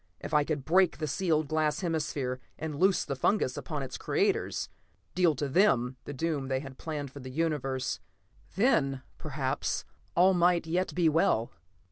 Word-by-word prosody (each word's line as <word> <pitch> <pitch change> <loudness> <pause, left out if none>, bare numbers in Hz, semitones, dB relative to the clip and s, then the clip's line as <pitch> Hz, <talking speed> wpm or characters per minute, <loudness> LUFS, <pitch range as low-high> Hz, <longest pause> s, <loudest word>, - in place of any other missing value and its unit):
If - - -7
I 150 -1 +5
could 145 -3 -3
break 185 +1 +4
the 155 - -2
sealed 155 0 +1
glass 155 +1 0
hemisphere, 145 -7 -2 0.2
and 155 -1 -4
loose 190 0 +3
the 140 - -3
fungus 130 -1 +1
upon 150 -4 -4
its 130 - -6
creators; - - 0 0.5
deal 175 -4 +3
to 145 +2 -2
them 135 - +3
the - - -5
doom 145 -1 -2
they 130 0 0
had 135 -1 -10
planned 145 -4 -4
for 140 - -10
the 130 -1 -8
universe, 135 -3 -1 0.6
then 140 - +2 0.2
perhaps 140 -3 -2 0.3
all 185 +2 +6
might 175 -1 +3
yet 175 +3 -1
be 175 -2 +3
well. 150 -7 +2
150 Hz, 165 wpm, -29 LUFS, 135-170 Hz, 0.6 s, all